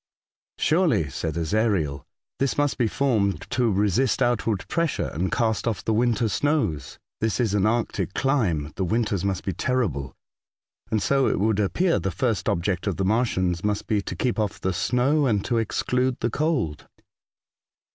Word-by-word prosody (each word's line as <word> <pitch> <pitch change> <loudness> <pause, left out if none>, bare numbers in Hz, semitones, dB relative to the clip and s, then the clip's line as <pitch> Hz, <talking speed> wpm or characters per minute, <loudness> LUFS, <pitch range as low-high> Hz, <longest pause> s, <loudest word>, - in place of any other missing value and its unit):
'' - - -73
Surely," 150 - +2
said 80 +4 -3
Ezariel, 85 -5 0 0.2
'' - - -64
this 135 -1 0
must 145 -1 +1
be 120 - +3
formed 110 -6 +1
to 120 -3 +2
resist 105 +6 +1
outward 115 -5 0
pressure, 165 -2 -1
and 90 +4 -1
cast 110 -1 0
off 110 -3 -2
the 110 - +1
winter 115 +1 +2
snows. 110 - -1 0.2
This 110 +2 0
is 115 -5 +1
an 105 0 +2
Arctic 110 -5 -1
clime. 90 - 0
The 95 - 0
winters 105 0 0
must 95 -2 -1
be 95 - -1
terrible, 90 - -1 0.7
and 110 -3 0
so 135 +6 +2
it - - 0
would 105 0 +1
appear 170 - +1
the 95 - -2
first 105 +4 -1
object 90 +3 -1
of 100 - -1
the 95 - 0
Martians 95 -5 +1
must 105 0 -1
be 105 -2 +1
to - - -6
keep 125 -3 -1
off 105 -2 -1
the 95 - -1
snow, 135 - +2
and 105 -5 +1
to 120 - +1
exclude 125 +3 0
the 120 - 0
cold." 135 - -1
110 Hz, 175 wpm, -24 LUFS, 95-125 Hz, 0.7 s, be